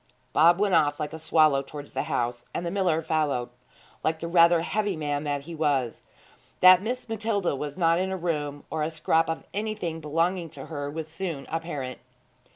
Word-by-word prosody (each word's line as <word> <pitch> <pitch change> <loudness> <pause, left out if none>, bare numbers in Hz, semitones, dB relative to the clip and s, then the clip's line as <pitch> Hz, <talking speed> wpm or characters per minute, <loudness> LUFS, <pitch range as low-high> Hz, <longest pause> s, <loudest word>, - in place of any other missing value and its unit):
Bob 170 +3 +6
went 205 -2 +2
off 145 -3 +3
like 150 0 -3
a 160 - -6
swallow 155 -3 +3
towards 145 +1 -10
the - - -1
house, 120 0 -2
and 175 - -2
the 170 - -2
miller 175 -5 +1
followed 150 -6 0 0.5
like 160 0 0
the 170 - -4
rather 170 0 +5
heavy 205 +1 -1
man 145 -1 -2
that 145 -1 -1
he 165 +4 -9
was. 145 -7 0 0.6
That 185 0 +8
Miss 245 +5 -3
Matilda 215 -7 -1
was 145 +1 -5
not 165 -1 +3
in 190 +1 0
her 190 - -2
room, 150 -5 -3
or 155 0 -2
a 150 - 0
scrap 160 +1 +1
of 160 - -3
anything 205 -6 -3
belonging 165 +3 0
to - - -7
her, 145 -3 -5
was 155 +1 -5
soon 160 -4 -5
apparent. 155 -6 -4
160 Hz, 190 wpm, -26 LUFS, 145-175 Hz, 0.6 s, That